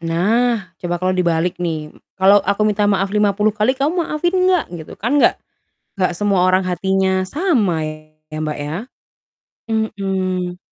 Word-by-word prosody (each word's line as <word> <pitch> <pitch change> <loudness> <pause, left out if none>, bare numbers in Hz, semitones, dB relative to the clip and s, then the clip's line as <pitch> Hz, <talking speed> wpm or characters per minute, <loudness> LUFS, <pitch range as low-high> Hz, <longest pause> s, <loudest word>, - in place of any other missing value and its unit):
Nah, 195 +5 0
coba 175 -1 -2
kalau 185 +1 0
dibalik 175 -1 0
nih, 160 -3 -3 0.2
"Kalau 195 +2 +5
aku 200 +2 0
minta 210 -1 +2
maaf 195 -1 +1
50 210 0 +2
kali, 215 +5 +1
kamu 300 +7 0
maafin 330 +2 -1
enggak?" 370 -2 +3
Gitu? 160 -3 -8
Kan, 270 +7 +1
enggak - - +4 0.6
enggak 185 - +2
semua 200 0 +1
orang 185 +1 +3
hatinya 190 +1 0
sama 225 - +1
ya, 155 0 -9
Mbak, 155 -1 -3
ya. 145 +2 -4 1.0
Mhm. 190 -4 -2
190 Hz, 145 wpm, -19 LUFS, 175-215 Hz, 1.0 s, Kalau